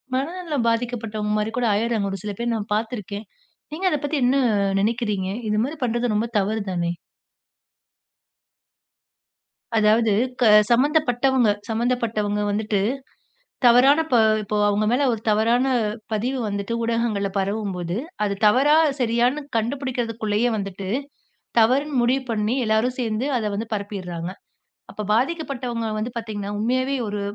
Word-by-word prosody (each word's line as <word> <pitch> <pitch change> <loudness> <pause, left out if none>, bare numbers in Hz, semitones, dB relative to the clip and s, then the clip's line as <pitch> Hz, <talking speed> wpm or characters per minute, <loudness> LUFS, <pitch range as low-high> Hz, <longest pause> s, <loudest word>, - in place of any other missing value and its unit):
மனநலம் 300 -1 -2
பாதிக்கப்பட்டவங்க 225 -3 -2
மாரி 210 +1 -1
கூட 250 - +1
ஆயிட்றாங்க, 215 -1 0
ஒரு 195 - -5
சில 210 - -3
பேர் 235 0 0
நான் 210 -1 -5
பார்த்திருக்கேன். 215 -2 -4 0.5
நீங்க 355 +5 -3
அதைப் 295 -2 -1
பத்தி 300 +1 -1
என்ன 255 +2 +3 0.5
நினைக்கிறீங்க? 210 -3 -1 0.2
இது 210 - +1
மாதிரி 290 +6 -4
பண்றது 240 -1 0
ரொம்ப 220 +3 0
தவறுதானே? 195 -4 -1 2.9
அதாவது 215 0 +4 0.3
க - - +5 0.2
சம்பந்தப்பட்டவங்க 260 -2 +3 0.2
சம்பந்தப்பட்டவங்க 225 -3 -1
வந்துட்டு 210 0 0 0.9
தவறான 250 +5 +6
பா 240 - +6 0.2
இப்போ 210 +1 -3
அவங்க 205 +1 +1
மேல 255 +4 +2
ஒரு 225 - -3
தவறான 230 +4 +3 0.5
பதிவு 245 +5 -1
வந்துட்டு 200 +2 -3
ஊடகங்கள்ல 230 -3 0
பரவும்போது, 195 -3 -2 0.3
அது 200 - -1
தவறா? 270 +8 +5 0.3
சரியான்னு? 240 +4 +2 0.2
கண்டுபிடிக்கறதுக்குள்ளேயே 235 -3 -1
வந்துட்டு, 195 -1 -5 0.7
தவறுன்னு 260 +4 +3
முடிவு 255 +3 +2
பண்ணி, 215 +1 0
எல்லாரும் 220 +3 +1
சேர்ந்து 225 +1 -1
அத 225 - -3
வந்து 220 +2 -4
பரப்பிடுறாங்க. 185 -4 -5 0.6
அப்ப 210 - -5
பாதிக்கப்பட்டவங்க 250 -4 -1
வந்து 230 +3 -3
பார்த்தீங்கன்னா, 210 -3 -5
உண்மையாவே 255 +5 0
ஒரு 205 0 -3
225 Hz, 120 wpm, -23 LUFS, 210-250 Hz, 2.9 s, தவறான